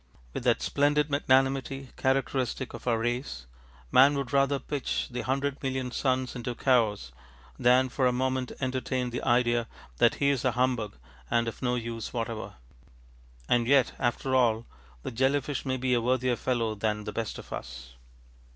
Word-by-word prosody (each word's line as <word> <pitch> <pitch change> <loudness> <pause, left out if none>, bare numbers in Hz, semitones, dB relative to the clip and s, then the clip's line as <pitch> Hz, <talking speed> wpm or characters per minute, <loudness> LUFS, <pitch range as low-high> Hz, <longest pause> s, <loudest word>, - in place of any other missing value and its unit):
With - - -5
that - - +2
splendid 145 +1 +2
magnanimity 135 -1 +1
characteristic 130 -1 -1
of - - -9
our 115 -2 +3
race, 120 - -3 0.5
man 140 +3 +6
would 140 -1 -4
rather 140 0 +3
pitch 140 0 -3
the 125 - -3
hundred 140 +2 -1
million 130 -2 -2
suns 130 -1 0
into 120 0 -4
chaos 110 - +1 0.5
than 125 +1 +5
for 130 +1 +1
a - - +3
moment 130 0 -1
entertain 130 -1 -2
the 120 - -3
idea 120 -1 +2 0.3
that - - +4
he 140 0 +2
is 135 -4 -1
a 130 - +2
humbug 125 -4 0 0.3
and 115 0 +2
of 115 - -6
no 125 -1 +1
use 115 -2 -4
whatever. 115 -4 -4 0.9
And 120 -1 +2
yet 135 -2 +4
after 130 +2 0
all 115 -3 +3 0.4
the - - -4
jelly 130 +4 +2
fish 140 0 -5
may 130 0 0
be 130 0 0
a 120 - +2
worthier 125 +1 +1
fellow 115 -3 -1
than 105 0 -2
the 105 - -6
best 115 -2 -3
of - - -9
us. 60 0 -8
125 Hz, 170 wpm, -28 LUFS, 115-135 Hz, 0.9 s, man